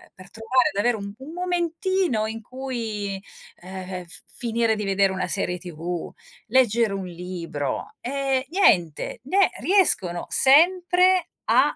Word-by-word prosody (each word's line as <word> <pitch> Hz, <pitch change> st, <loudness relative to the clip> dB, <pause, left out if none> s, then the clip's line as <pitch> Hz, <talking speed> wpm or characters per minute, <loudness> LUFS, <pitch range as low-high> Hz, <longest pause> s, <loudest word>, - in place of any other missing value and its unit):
per 185 Hz, +1 st, -13 dB
trovare 235 Hz, +3 st, +1 dB
ad 200 Hz, -, -2 dB
avere 235 Hz, +2 st, +2 dB
un 200 Hz, -1 st, -7 dB
un 280 Hz, +5 st, -9 dB
momentino 355 Hz, -, 0 dB
in 225 Hz, +1 st, -6 dB
cui, 225 Hz, -6 st, -5 dB, 0.4 s
ehm, 185 Hz, 0 st, -7 dB
f 170 Hz, -, -4 dB
finire 230 Hz, -2 st, 0 dB
di 210 Hz, -, -4 dB
vedere 195 Hz, 0 st, +2 dB
una 185 Hz, -1 st, -2 dB
serie 180 Hz, -1 st, -1 dB
tv, 175 Hz, 0 st, -5 dB, 0.4 s
leggere 235 Hz, -4 st, +3 dB
un 195 Hz, -1 st, -4 dB
libro, 175 Hz, -, -5 dB
e 270 Hz, 0 st, -1 dB
niente, 180 Hz, -, +2 dB
ne 375 Hz, +8 st, +3 dB
riescono 245 Hz, -, +2 dB
sempre 360 Hz, +5 st, +4 dB, 0.2 s
a 260 Hz, +5 st, +4 dB
225 Hz, 135 wpm, -24 LUFS, 190-290 Hz, 0.4 s, sempre